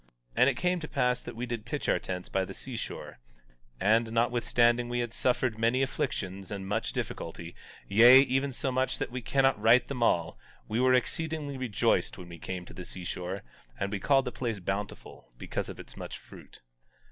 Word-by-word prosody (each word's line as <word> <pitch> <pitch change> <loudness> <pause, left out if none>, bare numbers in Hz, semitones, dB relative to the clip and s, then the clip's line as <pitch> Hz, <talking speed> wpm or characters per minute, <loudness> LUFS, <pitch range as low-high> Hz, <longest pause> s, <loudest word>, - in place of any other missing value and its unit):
17:6 - - -42
And 125 - +6
it 130 - -2
came 180 +3 +1
to 160 - -6
pass 125 -2 +1
that - - -8
we 120 +2 -3
did 120 -3 -4
pitch - - -4
our - - +3
tents 90 -1 -5
by 95 - 0
the - - -7
seashore; - - -6 0.6
and 110 +3 +3
notwithstanding 120 0 +2
we 120 - -1
had 120 -1 -2
suffered 125 -3 0
many 120 +4 +3
afflictions 100 -9 -3
and 100 -2 -5
much 110 +3 -1
difficulty, 85 +1 -5 0.3
yea, 120 +6 +9
even 135 +1 +1
so 130 +1 -2
much 130 +1 0
that - - -3
we 125 0 -4
cannot 135 -2 +2
write 115 +3 +5
them 130 -3 -4
all, 85 -8 +1 0.3
we 110 +2 -1
were 130 0 +5
exceedingly 155 +2 -2
rejoiced 125 -6 +1
when 90 -1 -10
we 85 -1 -10
came 90 0 -5
to - - -12
the 90 - -7
seashore; 90 +1 -5 0.4
and 100 0 -1
we 100 - -2
called 135 +2 +3
the 125 - -3
place 115 -3 -3
Bountiful, 95 -4 -5
because - - -4
of - - -8
its - - -9
much - - -7
fruit. - - -15
120 Hz, 195 wpm, -29 LUFS, 100-130 Hz, 0.6 s, yea